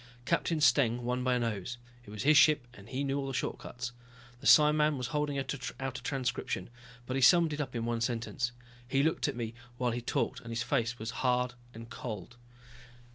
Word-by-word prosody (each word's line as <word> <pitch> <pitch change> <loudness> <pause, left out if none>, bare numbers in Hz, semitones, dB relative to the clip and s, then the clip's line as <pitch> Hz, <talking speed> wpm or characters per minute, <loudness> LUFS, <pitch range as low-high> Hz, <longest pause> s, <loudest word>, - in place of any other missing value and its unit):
Captain 165 +8 +1
Steng 125 -4 +4
won 125 +1 -1
by 130 -1 +2
a - - +1
nose, 115 0 -3 0.3
it - - -13
was 105 -1 -5
his 150 +2 +5
ship 145 -3 +5
and 100 0 -14
he 135 +2 -2
knew 140 0 0
all 135 - -3
the 135 - -3
shortcuts. 125 0 -4 0.5
The 135 - -3
psiman 150 -1 +6
was 125 -2 -3
holding 150 -1 0
out 135 - -2
a - - -5 0.4
transcription, 125 -3 -2 0.3
but 130 - -3
he 135 - 0
summed 165 +3 +6
it 150 - -2
up 130 -4 -5
in 115 -1 -2
one 115 -1 -1
sentence. 120 +2 -1 0.4
He 135 +2 +2
looked 160 0 +1
at 145 - -2
me 115 -1 -4 0.2
while 125 -1 +1
he 120 +1 -3
talked 120 - -1
and 115 - -11
his 115 0 -2
face 120 -3 0
was 110 +1 -4
hard 125 -1 +2 0.2
and 115 0 -9
cold. 110 -2 -6
125 Hz, 205 wpm, -31 LUFS, 120-140 Hz, 0.5 s, psiman